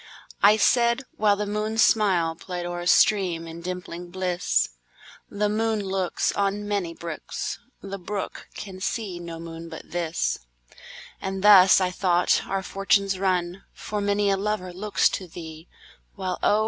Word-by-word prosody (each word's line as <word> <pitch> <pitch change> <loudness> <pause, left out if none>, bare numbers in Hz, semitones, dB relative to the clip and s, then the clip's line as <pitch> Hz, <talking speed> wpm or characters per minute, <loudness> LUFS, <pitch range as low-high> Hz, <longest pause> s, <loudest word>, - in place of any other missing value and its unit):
I 210 +2 +7
said 235 +3 +3 0.2
(whileThe 210 -1 +2
moon's 215 +2 +1
smilePlay'd 180 -3 +1
o'er 175 0 -4
a 175 - -4
stream, 185 -5 +3
in 165 +1 -8
dimpling 180 -1 -6
bliss),The 175 - -2
moon 220 +1 0
looksOn 195 +1 -1
many 200 -5 -2
brooks, 165 -2 -5 0.2
The 195 0 -6
brook 200 +2 -5
can 190 -2 -8
see 195 -4 -3
no 170 -1 -7
moon 165 0 -8
but - - -10
this; 170 -1 -1 0.8
And 190 0 -4
thus, 195 -3 +8
I 185 -1 0
thought, 180 -1 +2
our 195 0 -2
fortunes 195 0 +1
run, 185 -1 0
For 210 -1 -4
many 205 0 +2
a 195 - +2
lover 195 -3 -2
looks 205 +3 +2
to 185 - -5
thee, 160 -1 -10 0.5
While 185 -2 -3
oh! 210 - +3
190 Hz, 140 wpm, -25 LUFS, 175-205 Hz, 0.8 s, thus